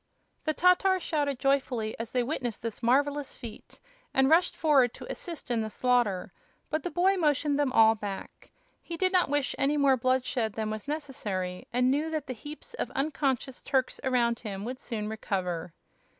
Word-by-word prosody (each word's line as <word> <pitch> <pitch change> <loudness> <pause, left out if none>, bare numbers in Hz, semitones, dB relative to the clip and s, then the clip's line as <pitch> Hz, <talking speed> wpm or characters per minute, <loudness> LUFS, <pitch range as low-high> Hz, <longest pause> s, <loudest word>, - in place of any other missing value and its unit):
The 310 -1 0
Tatars 365 +1 +4
shouted 290 -4 0
joyfully 255 -5 0
as 230 - -5
they 250 -1 +1
witnessed 240 -5 -3
this 230 -1 -4
marvelous 280 +3 +1
feat 230 -4 -10 0.4
and 265 +2 +4
rushed 340 +2 +4
forward 275 -6 +3
to - - -9
assist 335 -7 -6
in 230 -2 +1
the 220 - -3
slaughter; 240 -6 +1 0.4
but 310 - 0
the 355 - -3
boy 375 +3 +2
motioned 295 -3 +2
them 285 -3 +2
all 225 -2 +6
back. 205 -3 -7 0.3
He 335 - -6
did 370 +2 +2
not 365 -5 +3
wish 290 -1 +1
any 285 +2 +2
more 275 -2 +4
bloodshed 250 -3 0
than 215 0 -2
was 215 +4 -6
necessary, 210 -12 -3
and 250 +1 +3
knew 300 +4 0
that 310 -3 -2
the 255 - -4
heaps 295 - -10
of - - -3
unconscious 275 -2 -1
Turks 260 -2 0
around 240 -3 +2
him 200 -2 -5
would 255 +2 -5
soon 215 -3 -4
recover. 180 -6 -3
260 Hz, 180 wpm, -29 LUFS, 225-295 Hz, 0.4 s, all